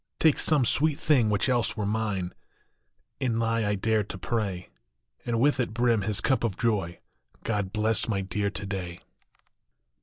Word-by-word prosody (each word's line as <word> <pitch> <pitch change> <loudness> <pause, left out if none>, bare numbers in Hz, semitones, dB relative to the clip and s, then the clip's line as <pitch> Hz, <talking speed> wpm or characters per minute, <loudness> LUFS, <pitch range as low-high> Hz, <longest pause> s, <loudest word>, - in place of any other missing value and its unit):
Take 160 -3 +4
some 150 -5 +3
sweet 150 +5 +2
thing 130 -8 +3
which 105 +3 +1
else 120 -3 +1
were 105 - -1
mine, 105 -4 -2 0.9
Inly 115 -2 0
I 105 0 0
dare 110 +2 +1
to 95 - -7
pray, 95 -3 -3 0.6
And 115 -1 0
with 145 +2 +3
it 120 -3 -1
brim 120 -2 +2
his 105 0 0
cup 130 -2 +1
of 110 -6 -1
joy 100 -7 -1 0.5
God 105 -4 -2
bless 110 +1 +1
my 100 -4 0
Dear 100 +2 -2
to 100 0 -6
day 90 -3 -5
110 Hz, 160 wpm, -27 LUFS, 100-120 Hz, 0.9 s, Take